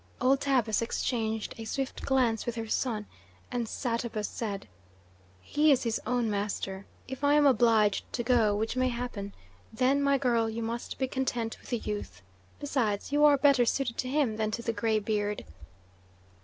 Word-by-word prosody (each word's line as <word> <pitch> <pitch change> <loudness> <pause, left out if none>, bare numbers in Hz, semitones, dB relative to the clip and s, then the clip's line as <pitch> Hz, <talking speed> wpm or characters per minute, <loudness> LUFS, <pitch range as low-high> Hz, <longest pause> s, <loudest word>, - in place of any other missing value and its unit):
Old 265 +2 +3
Tabus 245 -6 +2
exchanged 225 -2 -2
a - - -5
swift 270 +3 -3
glance 250 -4 +1
with 240 - -2
her 225 -1 -4
son, 220 -2 -1 0.5
and 240 -2 -2
Satabus 230 -3 -2
said: 205 -4 -5 0.7
"He 300 - +3
is 270 - +3
his 230 -2 -1
own 245 -1 +1
master. 200 -2 -3 0.2
If 265 +1 -7
I 285 +1 +5
am 295 -1 +5
obliged 225 -5 +3
to 240 - -1
go 230 -4 +3
which 220 +3 -2
may 255 0 +2
happen 235 -5 -4 0.4
then, 260 +5 +2
my 280 0 +3
girl, 235 -4 +1
you 225 +1 -4
must 230 +1 -4
be 265 - 0
content 250 -4 -2
with - - -14
the 240 - 0
youth. 100 - -6 0.4
Besides, 250 -7 -1
you 295 +1 +5
are 290 -1 +6
better 275 -2 +5
suited 240 0 -1
to 255 - -1
him 265 -6 +1
than 215 -1 0
to 235 +2 -4
the 230 - -1
graybeard." 215 -2 -1
235 Hz, 170 wpm, -29 LUFS, 220-260 Hz, 0.7 s, are